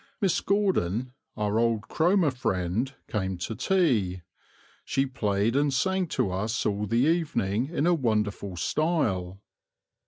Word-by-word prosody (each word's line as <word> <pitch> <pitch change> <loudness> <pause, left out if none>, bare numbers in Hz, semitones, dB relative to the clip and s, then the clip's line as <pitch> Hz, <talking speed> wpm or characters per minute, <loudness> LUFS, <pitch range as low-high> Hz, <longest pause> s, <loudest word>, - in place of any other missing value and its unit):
Miss 195 -4 +1
Gordon, 130 - 0 0.2
our 105 +1 0
old 115 -2 +2
Cromer 175 -2 +2
friend, 105 0 -1 0.2
came 95 -4 -2
to 90 +6 -4
tea: 110 - +1 0.6
she 135 - 0
played 110 -3 0
and 145 0 +2
sang 190 +7 +1
to 100 - -1
us 105 +5 -2
all 105 0 0
the 115 +3 0
evening 140 - 0
in 160 -2 -1
a 175 - +4
wonderful 105 - -1
style. 100 - 0
115 Hz, 130 wpm, -27 LUFS, 100-155 Hz, 0.6 s, a